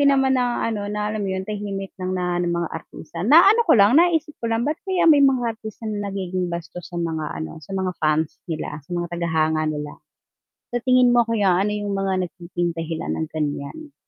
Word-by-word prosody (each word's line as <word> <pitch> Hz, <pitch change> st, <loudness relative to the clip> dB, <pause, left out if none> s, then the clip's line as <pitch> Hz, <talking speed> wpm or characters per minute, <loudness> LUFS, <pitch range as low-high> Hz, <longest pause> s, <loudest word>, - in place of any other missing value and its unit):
din 280 Hz, 0 st, +5 dB
naman 265 Hz, -1 st, +3 dB
na 245 Hz, -1 st, 0 dB
ano 210 Hz, -3 st, -2 dB
na 210 Hz, 0 st, -2 dB
alam 215 Hz, -1 st, -3 dB
mo 195 Hz, -, -2 dB
yun 190 Hz, -, -2 dB
tahimik 200 Hz, -2 st, -4 dB
ng 185 Hz, 0 st, -2 dB
na 180 Hz, -1 st, -1 dB
ng 175 Hz, -1 st, 0 dB
mga 170 Hz, -1 st, -1 dB
artista, 160 Hz, 0 st, -8 dB
naano 390 Hz, -, +7 dB
ko -, -, +7 dB
lang 205 Hz, +8 st, +6 dB
naisip 325 Hz, -3 st, +2 dB
ko -, -, -1 dB
lang 225 Hz, +1 st, +1 dB
ba't 300 Hz, +1 st, 0 dB
kaya 370 Hz, -2 st, +1 dB
may 295 Hz, -2 st, +6 dB
mga 245 Hz, -4 st, +2 dB
artista 220 Hz, 0 st, -9 dB
na 205 Hz, -1 st, -3 dB
nagiging 185 Hz, -2 st, -2 dB
bastos 170 Hz, +1 st, -6 dB
sa 175 Hz, -, -7 dB
mga 160 Hz, -2 st, -2 dB, 0.2 s
ano 80 Hz, -, -7 dB
sa 195 Hz, -, -11 dB
mga 190 Hz, -1 st, 0 dB
fans 155 Hz, 0 st, +1 dB
nila, 155 Hz, -2 st, -4 dB
sa -, -, -26 dB
mga 175 Hz, 0 st, -1 dB
taga-hanga 160 Hz, -2 st, +1 dB
nila. 150 Hz, -1 st, -5 dB, 0.8 s
Sa 245 Hz, -, +1 dB
tingin 255 Hz, -1 st, +5 dB
mo 240 Hz, -, +6 dB
kaya 205 Hz, -6 st, +2 dB
ano 210 Hz, -, 0 dB
yung 205 Hz, -1 st, -3 dB
mga 190 Hz, -2 st, 0 dB
nagiging 175 Hz, 0 st, -3 dB
dahilan 165 Hz, -1 st, -4 dB
ng 160 Hz, -, -2 dB
ganyan? 155 Hz, -, -4 dB
195 Hz, 215 wpm, -22 LUFS, 170-240 Hz, 0.8 s, naano